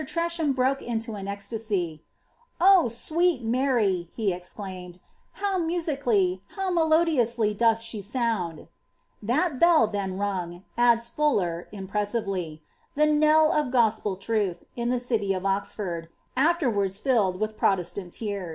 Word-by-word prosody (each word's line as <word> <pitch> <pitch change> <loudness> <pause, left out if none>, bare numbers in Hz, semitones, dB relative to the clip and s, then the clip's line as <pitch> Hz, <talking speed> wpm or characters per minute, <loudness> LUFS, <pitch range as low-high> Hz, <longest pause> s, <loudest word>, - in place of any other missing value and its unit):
Treafattm 335 -4 -1
broke 265 +2 +1
into 230 -1 -3
an 200 -2 -6
eoilasy— 200 -5 -3 0.3
>* 480 +1 -38
Oh, 375 -1 +6
awMt 310 +5 0
Mary~P 225 -8 +1
he 210 -5 0
exclaimed,^ 180 0 -8 0.4
how 390 -1 -1
mn8icaiiy, 280 - 0 0.2
how 385 -1 -1
melodioqaly 310 -10 +2
doth 225 +1 +3
ahe 230 -1 -5
aouadP 210 -6 -1
*^ - - -15 0.5
That 260 - 0
bell 340 -6 +6
then 200 -3 -3
rung," 185 -3 -3
adda 240 -1 +4
Fuller, 220 - 0
impreaaiTely, 195 -5 -3 0.2
«* - - -39
the 300 +1 +4
koell 305 +1 +4
of 300 -2 +2
goapd 220 -5 +1
troth, 200 -5 -1
in 235 0 -2
the 250 0 +1
city 225 -5 0
of 185 0 -4
Oxford, 195 -3 -2 0.3
afterwank 245 - +1
filled 210 -8 +1
with 215 0 -2
ProCeatant 185 -2 -1
team. 200 -4 -4
225 Hz, 135 wpm, -26 LUFS, 195-280 Hz, 0.5 s, Oh